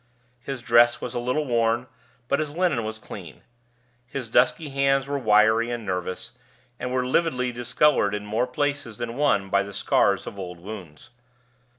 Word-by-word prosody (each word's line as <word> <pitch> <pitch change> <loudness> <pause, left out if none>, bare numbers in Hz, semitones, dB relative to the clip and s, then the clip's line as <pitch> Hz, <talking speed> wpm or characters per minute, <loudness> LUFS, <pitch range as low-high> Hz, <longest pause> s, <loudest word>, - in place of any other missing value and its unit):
His 130 0 -6
dress 120 0 +5
was 125 - -5
a 120 - -2
little 125 +5 -1
worn, 115 -1 +1 0.4
but 140 - +1
his 150 -1 -3
linen 175 -10 +1
was 110 0 -4
clean. 90 -8 -10 0.6
His 125 -3 -6
dusky 130 +6 +3
hands 135 -1 +2
were 140 0 -2
wiry 110 0 +4
and 120 -2 -4
nervous, 95 +4 -3 0.5
and 125 0 -3
were 130 0 0
lividly 125 -3 +1
discolored 120 -2 +2
in 105 0 -5
more 110 +4 0
places 140 -3 -2
than 120 0 -4
one 125 -9 +1
by 100 - +4
the 100 0 -7
scars - - +2
of 100 - -8
old 90 -2 -7
wounds. 90 -3 -10
120 Hz, 170 wpm, -25 LUFS, 105-135 Hz, 0.6 s, dress